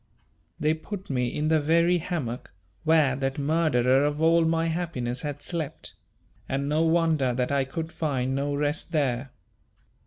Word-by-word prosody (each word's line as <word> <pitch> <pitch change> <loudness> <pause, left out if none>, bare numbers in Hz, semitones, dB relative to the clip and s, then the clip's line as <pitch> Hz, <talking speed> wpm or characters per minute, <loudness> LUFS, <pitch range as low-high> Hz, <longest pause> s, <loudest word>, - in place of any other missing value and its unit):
They 155 +1 +2
put 185 +2 -7
me 125 -2 0
in 150 +5 -1
the 160 -1 +4
very 170 +4 +3
hammock 155 -9 -4 0.3
where 155 -5 +4
that 135 0 -2
murderer 140 -4 +2
of 145 0 0
all 165 +1 +4
my 165 0 +1
happiness 160 -8 -2
had 145 -1 -5
slept, 165 -5 -5 0.6
and 135 +1 -1
no 150 +2 +1
wonder 160 -6 +2
that 125 +2 -1
I 140 -1 +2
could 160 +4 -5
find 135 -6 -1
no 140 +1 -1
rest 150 +4 -1
there. 135 -3 0
150 Hz, 155 wpm, -26 LUFS, 135-165 Hz, 0.6 s, the